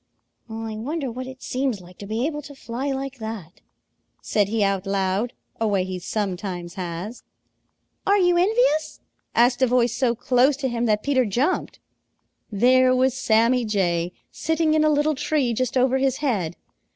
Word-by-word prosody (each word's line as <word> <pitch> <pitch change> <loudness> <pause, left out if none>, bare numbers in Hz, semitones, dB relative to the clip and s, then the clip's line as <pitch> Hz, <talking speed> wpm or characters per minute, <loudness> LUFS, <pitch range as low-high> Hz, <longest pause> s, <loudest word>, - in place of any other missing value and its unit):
"I 220 -1 -5
wonder 275 +3 -3
what 255 +2 -6
it 260 0 -10
seems 255 -4 -1
like 180 0 -16
to 200 - -8
be 225 +4 -1
able 295 -1 -2
to 285 0 -12
fly 265 +2 -4
like 270 0 -4
that," 220 -6 -7 0.6
said 205 -2 +1
he 215 0 0
out 195 -1 0
loud, 195 +4 0 0.3
a 225 - +1
way 200 -3 +1
he 185 0 -4
sometimes 180 -3 -3
has. 185 +4 -5 0.9
"Are 400 +1 +5
you 355 -2 +3
envious?" 360 -4 +2 0.4
asked 245 +2 +4
a 260 - +5
voice 240 -1 +2
so 240 -2 +1
close 255 +3 +3
to 280 -2 -1
him 235 0 -1
that 210 -1 +1
Peter 275 -2 +2
jumped. 245 - -1 0.7
There 255 +4 +4
was 260 0 +3
Sammy 235 0 +3
Jay 180 -5 0 0.2
sitting 320 -1 0
in 310 0 +3
a 310 - +4
little 300 +1 +2
tree 280 -3 0
just 255 +2 -1
over 260 +1 +3
his 265 -1 +1
head. 205 - -1
245 Hz, 170 wpm, -23 LUFS, 205-270 Hz, 0.9 s, Are